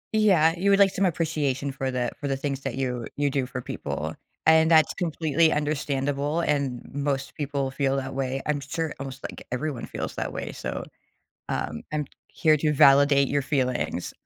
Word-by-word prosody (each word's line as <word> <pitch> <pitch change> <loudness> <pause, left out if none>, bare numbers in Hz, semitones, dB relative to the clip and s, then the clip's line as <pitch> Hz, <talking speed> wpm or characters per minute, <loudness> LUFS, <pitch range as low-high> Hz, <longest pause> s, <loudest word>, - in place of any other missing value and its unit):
Yeah, 185 -7 +5
you 190 +3 +1
would 200 - +6
like 200 -1 +5
some 195 - +1
appreciation 150 -5 -1
for 135 0 -3
the 125 -2 -1
for 145 - -3
the 135 -1 0
things 140 0 -3
that 135 -2 -4
you 125 -3 -2
you 145 -1 +1
do 135 -2 0
for 125 0 -5
people, - - -4 0.3
and 160 0 +6
that's 160 -2 +5
completely 160 -2 +1
understandable, 145 +1 -1
and 140 -6 -1
most 140 -1 -2
people 140 -2 -2
feel 135 -1 0
that 135 0 -4
way 135 0 -2
I'm 150 -1 0
sure 155 +2 -3
almost, 135 0 -7
like, - - -7
everyone 130 -1 -3
feels - - -5
that - - -3
way, - - -5
so, - - -5 0.7
um, 75 - -3
I'm 150 -1 0 0.2
here 155 -2 +3
to 150 +1 +1
validate 140 -1 +6
your 145 0 0
feelings. 130 - -1
140 Hz, 180 wpm, -26 LUFS, 135-155 Hz, 0.7 s, would